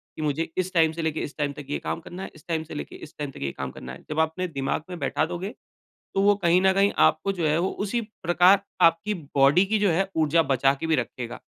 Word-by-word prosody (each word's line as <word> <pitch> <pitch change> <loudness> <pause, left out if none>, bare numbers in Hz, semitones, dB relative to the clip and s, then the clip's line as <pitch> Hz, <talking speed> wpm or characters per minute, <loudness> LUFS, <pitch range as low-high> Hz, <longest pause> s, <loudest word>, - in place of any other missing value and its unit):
कि - - -6
मुझे 155 +2 -1
इस 185 +1 -1
टाइम 160 -2 +4
से 165 +1 -5
लेके 160 -1 -1
इस - - -19
टाइम 145 -1 -1
तक 145 +1 -9
ये 145 - -2
काम - - -3
करना 180 +3 -8
है, - - -7
इस 155 - -17
टाइम 160 -2 -1
से 160 - -10
लेके - - -6
इस 150 - -12
टाइम 145 -2 -4
तक - - -12
ये 70 - -2
काम 65 -1 -5
करना 65 0 -9
है। - - -12
जब 155 - -2
आप 160 0 +3
अपने 185 +2 -3
दिमाग 140 0 -2
में 180 - -6
बैठा 155 - 0
दोगे, 180 +6 -5 0.6
तो 195 - +2
वो 205 0 +5
कहीं 175 +1 +4
न 190 0 +5
कहीं 200 +1 +3
आपको 175 +6 +1
जो 170 -4 -1
है 155 +2 +2
वो 185 - +1 0.2
उसी 235 +4 -1 0.2
प्रकार 180 +4 +5 0.2
आपकी 170 +6 +4 0.2
बॉडी 140 +7 +5
की 215 +2 +1
जो 205 -2 +3
है 190 +4 +1
ऊर्जा 160 +1 +3
बचा 135 +1 +4
के 165 - -2
भी 160 - +2
रखेगा। 120 -1 -4
165 Hz, 270 wpm, -25 LUFS, 150-185 Hz, 0.6 s, वो